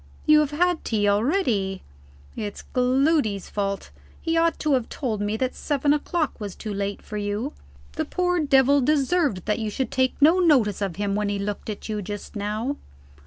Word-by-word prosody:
You 305 Hz, -1 st, +7 dB
have 300 Hz, -2 st, +2 dB
had 350 Hz, +3 st, +1 dB
tea 210 Hz, -3 st, 0 dB
already? 205 Hz, -, +1 dB, 0.5 s
It's 205 Hz, -2 st, -5 dB
Gloody's 255 Hz, -, +2 dB
fault; 200 Hz, -1 st, -3 dB, 0.3 s
he 330 Hz, -1 st, -1 dB
ought 330 Hz, 0 st, +2 dB
to 305 Hz, -2 st, 0 dB
have 250 Hz, -4 st, 0 dB
told 225 Hz, -7 st, -3 dB
me 205 Hz, +1 st, -1 dB
that 255 Hz, +2 st, -1 dB
seven 290 Hz, 0 st, +1 dB
o'clock 305 Hz, +1 st, -1 dB
was 205 Hz, -3 st, -5 dB
too 215 Hz, -2 st, -5 dB
late 200 Hz, 0 st, -3 dB
for 210 Hz, -, -6 dB
you. 205 Hz, +7 st, -2 dB, 0.4 s
The 315 Hz, -, -2 dB
poor 360 Hz, +2 st, 0 dB
devil 280 Hz, -1 st, +4 dB
deserved 285 Hz, -, +1 dB
that 210 Hz, +1 st, 0 dB
you 220 Hz, -1 st, -2 dB
should 250 Hz, +3 st, -3 dB
take 260 Hz, -1 st, +1 dB
no 320 Hz, +6 st, +6 dB
notice 255 Hz, -, +3 dB
of 195 Hz, -4 st, -2 dB
him 200 Hz, 0 st, -1 dB
when 210 Hz, 0 st, 0 dB
he 205 Hz, -, -1 dB
looked 205 Hz, +2 st, -4 dB
at 210 Hz, -, -6 dB
you 215 Hz, -1 st, -2 dB
just 205 Hz, +3 st, -7 dB
now. 215 Hz, +7 st, -2 dB
245 Hz, 185 wpm, -24 LUFS, 205-295 Hz, 0.5 s, You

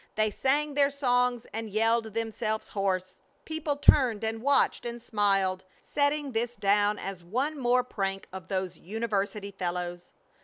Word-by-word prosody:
They 215 Hz, 0 st, +2 dB
sang 290 Hz, +6 st, +1 dB
their 280 Hz, 0 st, +4 dB
songs 250 Hz, -3 st, +1 dB
and 225 Hz, 0 st, -4 dB
yelled 225 Hz, +1 st, +1 dB
themselves 220 Hz, -1 st, -2 dB
hoarse. 185 Hz, -2 st, -2 dB, 0.3 s
People 315 Hz, -2 st, -2 dB
turned 255 Hz, -6 st, +4 dB
and 220 Hz, 0 st, -2 dB
watched 280 Hz, +3 st, +3 dB
and 240 Hz, 0 st, -5 dB
smiled, 195 Hz, -4 st, +1 dB, 0.2 s
setting 285 Hz, -1 st, 0 dB
this 240 Hz, +1 st, -1 dB
down 205 Hz, 0 st, +2 dB
as 190 Hz, -2 st, -6 dB
one 265 Hz, -, -2 dB
more 250 Hz, 0 st, +3 dB
prank 195 Hz, -5 st, -3 dB
of 185 Hz, -1 st, -7 dB
those 190 Hz, -2 st, -3 dB
university 205 Hz, 0 st, -2 dB
fellows. 175 Hz, -2 st, -4 dB
220 Hz, 145 wpm, -28 LUFS, 195-250 Hz, 0.3 s, their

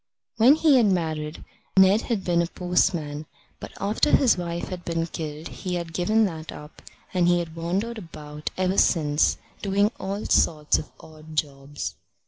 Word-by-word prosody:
When 245 Hz, +6 st, +7 dB
he 310 Hz, -4 st, +4 dB
had 235 Hz, -4 st, +4 dB
married, 160 Hz, -4 st, -2 dB, 0.3 s
Ned 190 Hz, +3 st, +6 dB
had 220 Hz, -6 st, -2 dB
been 170 Hz, -1 st, +2 dB
a 170 Hz, -, -1 dB
postman, 170 Hz, -4 st, -1 dB, 0.3 s
but -, -, -8 dB
after 210 Hz, +9 st, +1 dB
his 265 Hz, -5 st, +5 dB
wife 170 Hz, -1 st, -4 dB
had 180 Hz, -2 st, -6 dB
been 165 Hz, -1 st, -1 dB
killed 155 Hz, -1 st, -6 dB
he 180 Hz, -1 st, -4 dB
had 170 Hz, -2 st, -5 dB
given 215 Hz, +6 st, +2 dB
that 160 Hz, -4 st, -5 dB
up; 150 Hz, +1 st, -12 dB, 0.3 s
and 180 Hz, -2 st, +2 dB
he 175 Hz, 0 st, +4 dB
had 165 Hz, -2 st, -4 dB
wandered 195 Hz, +8 st, -2 dB
about 150 Hz, -4 st, -7 dB
ever 185 Hz, +1 st, +1 dB
since, 150 Hz, -3 st, +2 dB, 0.2 s
doing 200 Hz, +1 st, +2 dB
all 195 Hz, +2 st, -4 dB
sorts 150 Hz, -2 st, +2 dB
of -, -, -8 dB
odd 155 Hz, 0 st, -13 dB
jobs. 145 Hz, -1 st, -3 dB
170 Hz, 165 wpm, -25 LUFS, 155-195 Hz, 0.3 s, When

